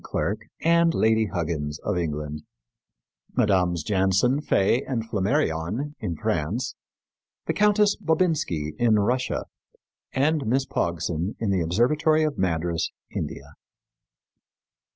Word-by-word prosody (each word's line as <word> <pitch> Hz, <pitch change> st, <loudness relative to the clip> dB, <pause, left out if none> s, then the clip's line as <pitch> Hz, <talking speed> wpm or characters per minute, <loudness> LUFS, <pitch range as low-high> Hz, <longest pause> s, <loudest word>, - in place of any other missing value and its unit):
Clerke, 105 Hz, +2 st, -2 dB, 0.2 s
and 170 Hz, 0 st, +4 dB
Lady 110 Hz, 0 st, +3 dB
Huggins, 80 Hz, -5 st, -3 dB
of -, -, -1 dB
England; 75 Hz, -3 st, -3 dB, 1.0 s
Mmes. 90 Hz, -5 st, +2 dB
Jansen, 100 Hz, +7 st, +2 dB
Faye, 115 Hz, -3 st, +2 dB
and 115 Hz, -5 st, -3 dB
Flammarion, 110 Hz, -, -1 dB
in 85 Hz, -, -3 dB
France; 95 Hz, -, -2 dB, 0.7 s
the -, -, 0 dB
Countess 210 Hz, 0 st, +3 dB
Bobinski, 160 Hz, -, 0 dB
in 115 Hz, -3 st, +4 dB
Russia; 125 Hz, +5 st, 0 dB, 0.7 s
and 145 Hz, -1 st, +1 dB
Miss 130 Hz, +4 st, +2 dB
Pogson, 85 Hz, 0 st, -2 dB
in 110 Hz, -3 st, -1 dB
the 95 Hz, -2 st, +1 dB
Observatory 150 Hz, -, +2 dB
of 155 Hz, -2 st, 0 dB
Madras, 85 Hz, -2 st, 0 dB, 0.3 s
India. -, -, -5 dB
105 Hz, 110 wpm, -25 LUFS, 85-140 Hz, 1.0 s, and